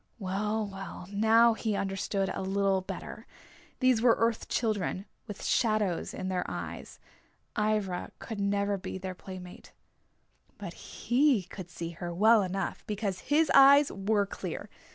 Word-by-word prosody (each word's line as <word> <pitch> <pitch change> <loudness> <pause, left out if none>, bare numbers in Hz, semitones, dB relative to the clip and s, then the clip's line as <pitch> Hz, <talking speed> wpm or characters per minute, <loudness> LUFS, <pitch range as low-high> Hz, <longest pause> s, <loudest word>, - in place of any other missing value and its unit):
Well, 210 +2 -1
well, 195 -2 -8
now 225 +3 +5
he 220 -1 -2
understood 195 0 -1
a - - -4
little 195 0 +1
better. 185 - -8 0.5
These 255 -3 +4
were 235 -1 +5
Earth 230 -1 0
Children, 205 -4 -1 0.2
with 205 -2 -7
shadows 215 -7 +1
in 185 - -5
their 185 -1 -1
eyes. - - -6 0.6
Ivra 210 -4 -1
could 220 -3 -7
never 200 0 0
be 185 - -5
their 190 0 -5
playmate. 180 0 -10 0.8
But - - -7
he 255 -4 +1
could 180 0 -9
see 170 -1 -6
her 175 +1 -6
well 215 +5 +5
enough 195 0 -3
because 205 -3 -2
his 305 +2 +3
eyes 280 +1 +7
were 200 +1 +1
clear. 200 - -6
200 Hz, 140 wpm, -29 LUFS, 190-220 Hz, 0.8 s, eyes